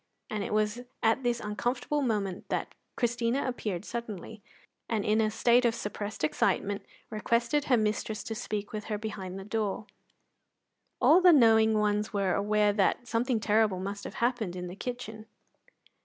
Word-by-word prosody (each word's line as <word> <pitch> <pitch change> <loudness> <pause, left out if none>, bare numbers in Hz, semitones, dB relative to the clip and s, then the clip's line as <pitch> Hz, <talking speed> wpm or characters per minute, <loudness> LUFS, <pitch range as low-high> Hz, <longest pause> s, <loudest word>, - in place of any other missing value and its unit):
And 210 -2 -2
it - - -5
was 215 +2 0 0.2
at 225 +3 +3
this 240 -2 0
uncomfortable 245 +7 -1
moment 205 -7 -2
that - - -2 0.2
Christina 240 +2 0
appeared 210 -7 -3
suddenly, 220 -2 -6 0.5
and 220 -3 0
in 215 +1 +3
a 215 - +2
state 240 +3 +3
of 235 -1 +2
suppressed 205 -3 -5
excitement 195 +6 0 0.3
requested 235 +6 +1
her 250 - +4
mistress 215 0 -1
to 225 - -4
speak 210 -1 -4
with 210 -1 -4
her 210 - -2
behind 195 -3 -6
the 195 - -7
door. 210 -1 -2 1.1
All 345 +4 +6
the 360 -1 +8
knowing 220 -6 +5
ones 210 0 +1
were 195 -3 +1
aware 210 0 +2
that 210 +4 +1
something 235 0 0
terrible 210 -3 +2
must 200 +2 -5
have - - -7
happened 235 -7 -1
in 180 0 -5
the 180 +1 -7
kitchen. 225 -2 -6
215 Hz, 160 wpm, -29 LUFS, 205-235 Hz, 1.1 s, the